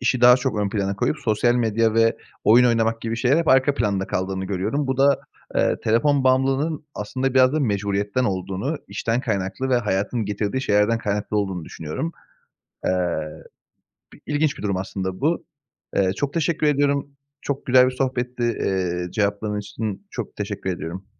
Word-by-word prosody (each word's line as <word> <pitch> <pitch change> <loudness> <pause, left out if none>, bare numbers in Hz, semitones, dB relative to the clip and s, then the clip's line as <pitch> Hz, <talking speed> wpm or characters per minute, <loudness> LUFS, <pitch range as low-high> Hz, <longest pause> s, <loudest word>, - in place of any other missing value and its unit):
işi 125 0 +1
daha 125 +1 +8
çok 120 -3 -2
ön 100 - 0
plana 100 -1 -2
koyup 150 - 0
sosyal 120 -1 +2
medya 115 -2 +1
ve 115 0 +3 0.3
oyun 120 +3 +6
oynamak 115 -1 +1
gibi 115 0 -3
şeyler 125 +5 +3
hep 165 - -1
arka 135 +2 +4
planda 100 -6 0
kaldığını 95 +1 -2
görüyorum. 105 +10 -1
Bu 130 -1 -1
da, 140 0 +4 0.3
eee, - - +2
telefon 135 +5 +2
bağımlılığının 135 +4 +1
aslında 130 +5 -2
biraz 130 0 +5
da 155 - +1
mecburiyetten 100 +1 0
olduğunu, 95 - -2
işten 115 +4 -1
kaynaklı 100 +1 -2
ve 125 - +3
hayatın 105 +1 -1
getirdiği 105 +5 -2
şeylerden 105 +2 +2
kaynaklı 105 0 -2
olduğunu 95 -5 -1
düşünüyorum. 80 - -5 0.7
Eee, 90 -3 +1 1.0
bi - - -17
ilginç 150 -1 0
bir - - -9
durum 100 -2 0
aslında 95 +2 -4
bu. 160 +4 +1 0.5
Eee, 95 -1 +2
çok 140 +6 -3
teşekkür 165 -2 +1
ediyorum. 140 -1 +1 0.3
Çok 140 -1 -4
güzel 125 0 +6
bir - - 0
sohbetti, 125 -1 -2
eee, 90 -6 -1
cevapların 105 0 -1
için 105 0 -5
çok - - -6
teşekkür 95 - -4
ediyorum. 90 +2 -5
115 Hz, 165 wpm, -23 LUFS, 100-130 Hz, 1.0 s, daha